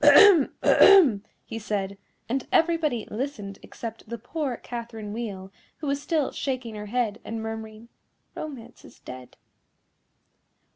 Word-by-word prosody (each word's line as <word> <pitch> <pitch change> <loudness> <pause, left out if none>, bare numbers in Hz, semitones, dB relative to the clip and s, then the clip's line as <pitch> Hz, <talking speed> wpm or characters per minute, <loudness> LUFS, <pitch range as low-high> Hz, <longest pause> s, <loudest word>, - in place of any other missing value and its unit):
"Ahem! 300 +2 +8
ahem!" 305 - +7 0.2
he 225 - -6
said, 200 -2 -2 0.3
and 260 +2 -2
everybody 320 -9 +2
listened 210 -5 -4
except 225 -1 -8
the 235 - -4
poor 255 +2 -3
Catherine 230 -3 -7
Wheel, 200 -5 -5 0.3
who 310 - -7
was 280 0 -1
still 305 -2 0
shaking 255 -4 -3
her 210 0 -7
head, 230 -1 -1
and 225 0 -5
murmuring, 220 0 -6 0.5
"Romance 250 -6 -8
is - - -15
dead." 125 -1 -11
235 Hz, 130 wpm, -26 LUFS, 215-280 Hz, 0.5 s, Ahem